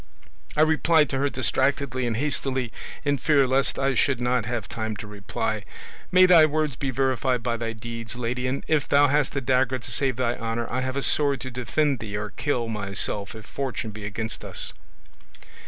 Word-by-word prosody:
I - - +5
replied 160 -1 +3
to 135 - -1
her 145 +1 +2
distractedly 130 0 0
and 115 -2 -1
hastily, 130 -3 -1 0.3
in 145 -1 +1
fear 145 -3 +4
lest 130 +2 +1
I 135 0 +1
should 130 +1 +2
not 125 -2 +1
have 115 -3 -3
time 110 -1 -4
to 100 - -7
reply, 105 +1 -3 0.5
'May 185 0 +7
thy 170 -4 +7
words 155 -3 -1
be 135 +1 -2
verified 130 -1 0
by 120 0 0
thy 115 -1 -3
deeds, 115 0 -6
lady; 125 +1 -2
and 135 +2 -2
if 155 -3 +1
thou 145 0 +5
hast 145 0 +1
a 140 - 0
dagger 130 0 +2
to 120 - -7
save 135 -3 +2
thy 120 -1 0
honour, 115 0 -2
I 130 +2 0
have 130 +1 -2
a 140 - 0
sword 140 -2 +3
to 130 - -5
defend 130 +3 0
thee 105 -2 -4
or 105 0 -4
kill 125 -5 -1
myself 100 -1 -2
if 110 - -10
fortune 130 -5 -4
be 105 0 -9
against 110 +2 -4
us. - - -3
130 Hz, 195 wpm, -25 LUFS, 115-140 Hz, 0.5 s, May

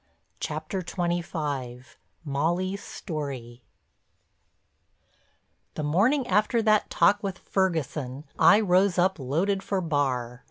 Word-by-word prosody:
CHAPTER 155 +5 -3
XXV—MOLLY'S 165 - -3
STORY 135 - -6 2.1
The 155 - -3
morning 220 - +2
after 215 +3 +2
that 215 -1 +3
talk 205 0 +3
with 195 -2 -4
Ferguson 150 -9 -2 0.2
I 200 +7 +7
rose 185 -1 +3
up 185 0 +2
"loaded 170 +10 0
for 195 0 -1
bar." 130 -7 -1
170 Hz, 90 wpm, -26 LUFS, 140-195 Hz, 2.1 s, I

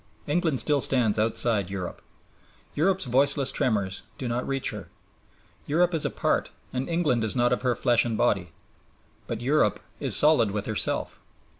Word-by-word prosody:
England 155 -3 0
still 145 -2 +2
stands 115 -5 +2
outside 110 -3 +1
Europe. 95 -3 -6 0.7
Europe's 185 +2 0
voiceless 135 +2 +2
tremors 100 -6 -1 0.2
do 130 - -5
not 120 +1 -3
reach 135 -1 -1
her. - - -9 0.8
Europe 175 +4 +1
is 160 - 0
apart - - -1 0.2
and 130 +4 -4
England 160 -9 0
is 110 - -3
not 120 0 +2
of - - -2
her 125 -2 0
flesh 120 -3 +2
and 115 -2 -3
body. 90 -5 0 0.8
But 115 -1 -5
Europe 130 -5 +1 0.2
is - - +5
solid 150 -8 +6
with 105 0 -4
herself. 110 - -1
125 Hz, 155 wpm, -25 LUFS, 110-145 Hz, 0.8 s, solid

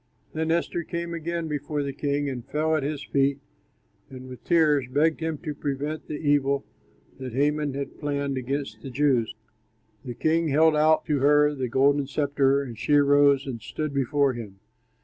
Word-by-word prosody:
Then 160 0 -2
Esther 170 +1 0
came 170 0 -4
again 170 0 -3
before 145 0 -3
the 140 -1 -4
king 145 +1 -1
and 130 -3 -4
fell 155 +4 0
at 155 - 0
his 145 0 -3
feet 140 0 +1 0.7
and 130 -1 -10
with 125 - -11
tears 150 -6 +3
begged 155 +4 +1
him 160 -1 -2
to 155 -3 -3
prevent 145 +2 -4
the 150 - -4
evil 140 -2 +1 0.5
that 130 -3 -6
Haman 145 +1 0
had 140 0 -6
planned 140 -2 -2
against 135 +2 -4
the 135 - -7
Jews. 130 -4 +1 0.7
The 125 -2 -6
king 165 +4 +1
held 155 +2 +4
out 155 +1 +3
to 150 -3 0
her 150 +2 +4
the 130 -3 -3
golden 140 +3 +2
sceptre, 140 -1 +1
and 120 -5 -9
she 150 - 0
arose 145 -1 +4
and 125 -5 -6
stood 155 -2 -4
before 140 0 +1
him. 110 -5 -8
145 Hz, 175 wpm, -25 LUFS, 135-155 Hz, 0.7 s, held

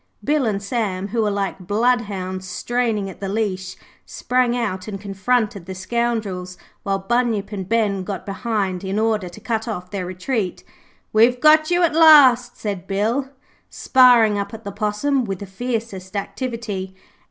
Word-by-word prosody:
Bill 295 -4 +1
and 200 -2 -2
Sam, 200 -3 -2
who 230 +2 0
were 215 - +1
like 195 -2 -3
bloodhounds 205 -5 0
straining 225 +1 -1
at 190 - -10
the 195 - -4
leash, 195 -3 -2 0.3
sprang 250 -1 0
out 190 -5 -3
and 200 -2 -5
confronted 200 -1 -1
the 190 - -6
scoundrels, 195 -3 -2 0.2
while 195 -2 -1
Bunyip 225 0 0
and 190 -3 -5
Ben 210 -4 +1
got 195 0 -5
behind 195 -2 -2
in 190 +1 -2
order 215 -4 0
to 175 - -12
cut 225 -1 -2
off 180 -5 -5
their 190 -3 -3
retreat. 185 +2 -3 0.5
'We've 235 +3 +4
got 310 +2 +5
you 350 0 +2
at 335 - +3
last,' 280 -7 +6
said 200 -5 -5
Bill, 225 +8 0 0.4
sparring 240 -5 +5
up 200 +2 -4
at 225 - -11
the 200 - -5
Possum 215 +7 0
with 195 -4 -3
the 200 - -7
fiercest 205 -2 -5
activity. 205 -4 -4
210 Hz, 160 wpm, -21 LUFS, 195-240 Hz, 0.5 s, last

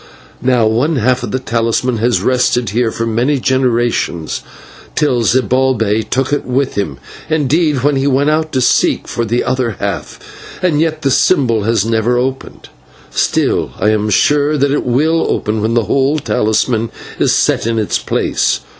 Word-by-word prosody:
Now 125 -2 +2
one 120 +9 +1
half 125 0 +1
of 120 - -4
the 130 - -1
talisman 115 0 -1
has 115 -4 +1
rested 125 -3 +1
here 115 +2 +1
for 115 - -3
many 120 +5 0
generations, 120 -10 0 0.5
till 130 -5 +1
Zibalbay 120 -3 +1
took 135 +2 0
it 145 - 0
with 130 +2 -1
him 85 -10 -3 0.3
indeed, 150 -2 +1
when 145 -1 +2
he 135 +1 0
went 140 +2 +2
out 155 0 -1
to 130 - +1
seek 125 - +2
for 120 - -2
the 120 +2 0
other 125 -5 -1
half, - - -4 0.4
and 160 -5 +2
yet 155 -1 -1
the 135 - +1
symbol 120 - +2
has 115 -2 +1
never 115 +2 +1
opened; 130 +2 -4 0.4
still, - - 0
I 105 - +2
am 110 0 0
sure 145 +7 +2
that 140 0 +1
it 145 - 0
will 155 +7 +1
open 105 0 -1
when 110 +2 0
the 120 - +2
whole 135 +7 +1
talisman 110 -1 0 0.3
is - - +2
set - - +1
in 115 -1 -1
its 110 -2 0
place. - - 0
125 Hz, 170 wpm, -15 LUFS, 115-140 Hz, 0.5 s, Now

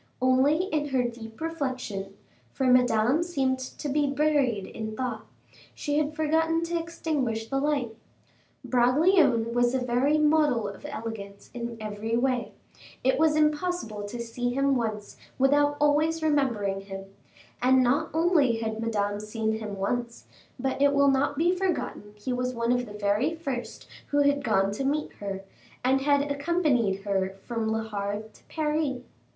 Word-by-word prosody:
Only 260 +6 +3
in 305 -6 -1
her 260 -3 +1
deep 230 -2 -7
reflection, 255 -11 -4 0.3
for 265 - -2
Madame 250 +2 +4
seemed 270 -7 0
to 260 +3 -6
be 290 +1 +1
buried 275 -7 +1
in 220 -1 -6
thought, 250 -4 -3 0.5
she 295 0 0
had 305 0 -1
forgotten 325 +1 +1
to 340 0 -1
extinguish 295 -9 -2
the 270 - 0
light. 275 -6 -1 0.7
Bragelonne 255 -1 +3
was 245 +1 +2
a - - +2
very 250 +4 +2
model 300 -7 +3
of 200 - -8
elegance 205 -3 -7
in 235 -1 -5
every 215 +2 -2
way; 250 -1 0 0.5
it 265 +2 +2
was 315 -1 +4
impossible 305 - 0
to 235 +4 -6
see 245 +1 -2
him 275 +2 +2
once 215 -4 -3 0.2
without 290 +2 +3
always 310 +2 +2
remembering 235 -11 +1
him; 195 0 -8 0.6
and 260 +1 +5
not 280 +6 +1
only 315 -7 +3
had 220 -1 -3
Madame 205 -3 -1
seen 220 +1 -2
him 210 -2 -5
once, 235 +4 -3 0.3
but 265 +2 -2
it 285 0 +5
will 280 0 +5
not 270 +1 +1
be 345 +4 +3
forgotten 250 - -3
he 210 +5 -4
was 250 0 -2
one 235 0 0
of 245 -1 +1
the 205 - -9
very 210 +9 0
first 275 -7 -5 0.2
who 290 0 +2
had 285 0 +2
gone 195 -4 +2
to 210 +7 -3
meet 295 +3 -1
her, 195 -1 -5 0.4
and 265 +1 +3
had 285 0 +2
accompanied 280 - +1
her 195 -1 -1
from 230 -2 -2
Le 225 0 -1
Havre 205 0 -3
to - - -21
Paris. 300 -4 -1
255 Hz, 155 wpm, -27 LUFS, 225-295 Hz, 0.7 s, and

